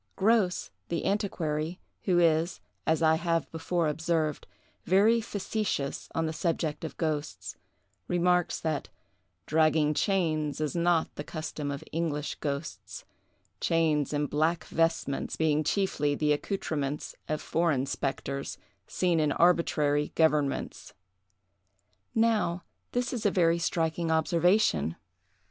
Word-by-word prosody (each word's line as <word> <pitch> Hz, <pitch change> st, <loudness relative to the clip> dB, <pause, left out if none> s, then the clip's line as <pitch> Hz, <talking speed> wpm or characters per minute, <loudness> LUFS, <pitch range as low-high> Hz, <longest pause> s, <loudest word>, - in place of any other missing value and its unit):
Grose, 200 Hz, -3 st, +2 dB, 0.2 s
the 170 Hz, -, -2 dB
antiquary, 170 Hz, -5 st, -1 dB, 0.3 s
who 180 Hz, -3 st, +3 dB
is, 165 Hz, 0 st, +3 dB, 0.3 s
as 160 Hz, +1 st, +2 dB
I 160 Hz, 0 st, +5 dB
have 165 Hz, -1 st, 0 dB
before 165 Hz, +1 st, -1 dB
observed, 160 Hz, -1 st, -1 dB, 0.4 s
very 215 Hz, +5 st, +4 dB
facetious 205 Hz, -8 st, -3 dB
on 165 Hz, -, +1 dB
the 160 Hz, -, -2 dB
subject 160 Hz, -2 st, -1 dB
of 160 Hz, -, -6 dB
ghosts, 155 Hz, -2 st, -3 dB, 0.5 s
remarks 180 Hz, 0 st, +2 dB
that 155 Hz, -3 st, -2 dB, 0.6 s
"Dragging 155 Hz, -1 st, +3 dB
chains 155 Hz, -5 st, 0 dB
is 155 Hz, +1 st, -2 dB
not 170 Hz, -1 st, +2 dB
the 145 Hz, -, -6 dB
custom 155 Hz, -2 st, -5 dB
of 140 Hz, 0 st, -4 dB
English 155 Hz, -2 st, -2 dB
ghosts, 145 Hz, +1 st, -5 dB, 0.5 s
chains 155 Hz, -4 st, +1 dB
and 145 Hz, 0 st, 0 dB
black 160 Hz, +4 st, +1 dB
vestments 165 Hz, -4 st, 0 dB
being 155 Hz, -1 st, +2 dB
chiefly 150 Hz, -5 st, +1 dB
the 150 Hz, 0 st, +2 dB
accoutrements 150 Hz, -4 st, -3 dB, 0.2 s
of 155 Hz, 0 st, 0 dB
foreign 160 Hz, -6 st, +1 dB
spectres, 140 Hz, 0 st, -3 dB, 0.3 s
seen 175 Hz, -3 st, +1 dB
in 150 Hz, -1 st, +2 dB
arbitrary 150 Hz, -3 st, +2 dB
governments." 150 Hz, -3 st, 0 dB, 1.2 s
Now, 220 Hz, -6 st, +2 dB, 0.3 s
this 245 Hz, +1 st, -1 dB
is 235 Hz, -3 st, -3 dB
a 205 Hz, -, +4 dB
very 170 Hz, -3 st, +3 dB
striking 165 Hz, 0 st, 0 dB
observation. 160 Hz, -, +2 dB
160 Hz, 120 wpm, -29 LUFS, 150-175 Hz, 1.2 s, I